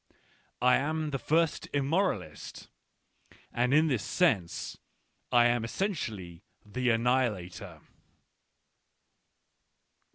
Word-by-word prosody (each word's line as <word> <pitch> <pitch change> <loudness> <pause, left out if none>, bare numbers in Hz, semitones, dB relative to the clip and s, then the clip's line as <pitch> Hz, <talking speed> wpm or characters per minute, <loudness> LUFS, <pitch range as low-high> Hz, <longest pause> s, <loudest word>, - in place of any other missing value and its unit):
I 125 0 +6
am 155 +2 -2
the 135 - -2
first 160 +2 +1
immoralist, 140 - -2 0.8
and 125 +1 +1
in 155 +3 +5
this 130 -9 0
sense^lim 120 - 0
essentially 110 - -3 0.2
the 125 +4 -1
annihilator. 110 -7 0
125 Hz, 70 wpm, -29 LUFS, 105-150 Hz, 0.8 s, I